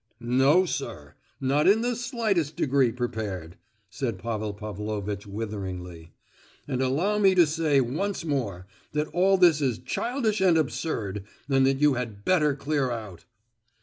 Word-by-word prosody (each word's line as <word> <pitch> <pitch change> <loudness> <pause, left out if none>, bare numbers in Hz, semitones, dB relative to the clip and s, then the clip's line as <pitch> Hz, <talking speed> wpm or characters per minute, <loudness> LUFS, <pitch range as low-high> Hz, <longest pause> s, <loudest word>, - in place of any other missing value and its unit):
"No, 135 +9 +4
sir; 75 - -5 0.3
not 140 +3 +2
in 210 +3 +5
the 245 0 0
slightest 220 - -1
degree 135 -4 +2
prepared," 105 -8 -4 0.4
said 115 -6 -3
Pavel 110 0 -3
Pavlovitch 105 -1 -5
witheringly; 95 -5 -6 0.6
"and 130 -2 -1
allow 165 +11 +1
me 195 -2 +5
to 175 -2 +7
say 155 -2 +2
once 165 +9 -2
more 110 - -2 0.3
that 150 +1 -1
all 190 +2 +3
this 170 -5 +5
is 130 -5 +1
childish 220 - -1
and 180 -3 +5
absurd, 115 - -2 0.2
and 135 -1 +3
that 135 0 +2
you 150 -1 +5
had 115 -5 -5
better 150 -6 +3
clear 140 -2 -1
out!" 110 -8 -6
135 Hz, 145 wpm, -26 LUFS, 105-165 Hz, 0.6 s, to